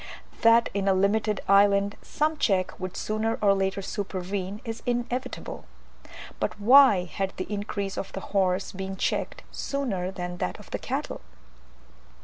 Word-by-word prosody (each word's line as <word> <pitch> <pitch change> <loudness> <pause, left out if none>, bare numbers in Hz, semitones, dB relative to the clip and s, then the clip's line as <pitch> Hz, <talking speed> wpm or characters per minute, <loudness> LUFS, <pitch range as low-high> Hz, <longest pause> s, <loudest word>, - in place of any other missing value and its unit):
That 230 +1 +5
in 200 0 -1
a 195 - +4
limited 210 +2 +1
island 200 0 +4
some 310 +1 0
check 190 -8 +1
would 185 -1 -5
sooner 215 +1 -1
or 200 -1 +4
later 195 0 -1
supervene, 190 0 -4
is 225 -1 -5
inevitable; 245 +1 -3 0.7
but - - -2
why 240 -3 +7
had 190 +3 -3
the 185 - -3
increase 200 -1 -3
of 195 - -5
the - - -3
horse 190 -1 +1
been 190 0 -5
checked - - -2
sooner 225 -11 -2
than 180 -2 -5
that 90 - -2
of - - -15
the - - -2
cattle? - - -4
200 Hz, 145 wpm, -27 LUFS, 190-220 Hz, 0.7 s, why